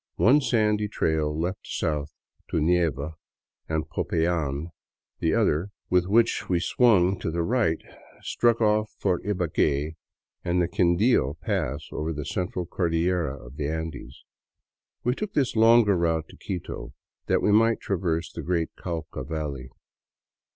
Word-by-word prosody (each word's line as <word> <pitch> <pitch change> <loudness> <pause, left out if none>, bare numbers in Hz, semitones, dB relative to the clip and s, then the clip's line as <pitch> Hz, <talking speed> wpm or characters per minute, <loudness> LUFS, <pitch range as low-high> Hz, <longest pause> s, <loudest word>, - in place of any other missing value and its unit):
One 140 +6 +5
sandy 105 -4 +2
trail 80 -6 0
led 90 +3 -1
south 75 -1 -2 0.4
to - - -1
Neiva 80 -2 +1 0.5
and 80 -1 -1
Popayan; 80 -2 -1 0.5
the - - +1
other, 80 +7 +1 0.2
with 90 -1 +3
which 115 +3 +2
we 90 -2 +2
swung 95 -3 +3
to - - -2
the 85 +1 -1
right, 110 -6 +1 0.4
struck 120 -1 +2
off 105 0 +2
for 90 - +1
Ibague 80 -6 0 0.5
and 90 +1 +1
the 85 - +2
Quindio 85 - +2
pass 80 - -2
over 80 +2 -3
the 75 -2 -5
Central 90 0 -2
Cordillera 85 -5 -1
of 65 +4 -12
the 75 - -1
Andes. 80 -1 -5 0.8
We 125 - +2
took 210 +8 -5
this 135 -5 +1
longer 115 -2 +6
route 80 -2 0
to - - -14
Quito 80 -8 -6 0.3
that - - +2
we 105 - +3
might 115 +2 +4
traverse 85 -4 -1
the - - -6
great 85 -2 -1
Cauca 80 -6 -5
valley. 70 -3 -4
85 Hz, 140 wpm, -26 LUFS, 80-105 Hz, 0.8 s, longer